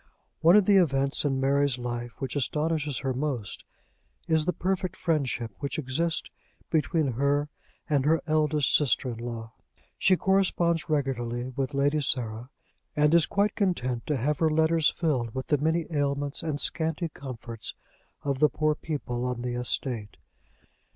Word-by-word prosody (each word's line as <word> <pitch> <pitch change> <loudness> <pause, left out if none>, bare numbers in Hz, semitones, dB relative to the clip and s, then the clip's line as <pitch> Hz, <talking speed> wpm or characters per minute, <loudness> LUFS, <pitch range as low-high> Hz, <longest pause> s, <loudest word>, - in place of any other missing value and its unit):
One 170 +3 +6
of 210 -2 +6
the 200 0 +5
events 140 -5 +2
in 135 -2 +1
Mary's 140 0 +2
life 120 -1 -4
which 135 -1 -4
astonishes 150 0 -1
her 130 - +1
most 130 -6 -3 0.6
is 160 -1 +2
the 180 - +2
perfect 185 +1 -2
friendship 140 - -1
which 140 +3 -3
exists 155 +4 -1 0.4
between 160 -2 +1
her 140 +4 +1 0.4
and 145 -3 +2
her 160 +2 +4
eldest 155 -3 +2
sister 130 -2 +2
in 115 - -7
law. 115 -1 -6 0.5
She 185 - +4
corresponds 175 -4 +1
regularly 125 -4 -1
with 135 0 -2
Lady 145 +2 +2
Sarah, 120 -3 -1 0.5
and 150 +1 +3
is 170 -1 +5
quite 205 +1 +1
content 130 - -1
to 150 - +1
have 145 +4 0
her 160 - +3
letters 160 0 +3
filled 130 -9 -1
with 130 - -3
the 150 - +1
many 160 +2 +1
ailments 140 -1 0
and 155 -3 -2
scanty 160 +2 0
comforts 120 -5 -7 0.5
of 140 -2 -1
the 150 0 +5
poor 155 +1 +1
people 140 -6 -4
on 125 -1 -2
the 125 -1 -2
estate. 120 -2 -1
145 Hz, 155 wpm, -27 LUFS, 125-160 Hz, 0.6 s, One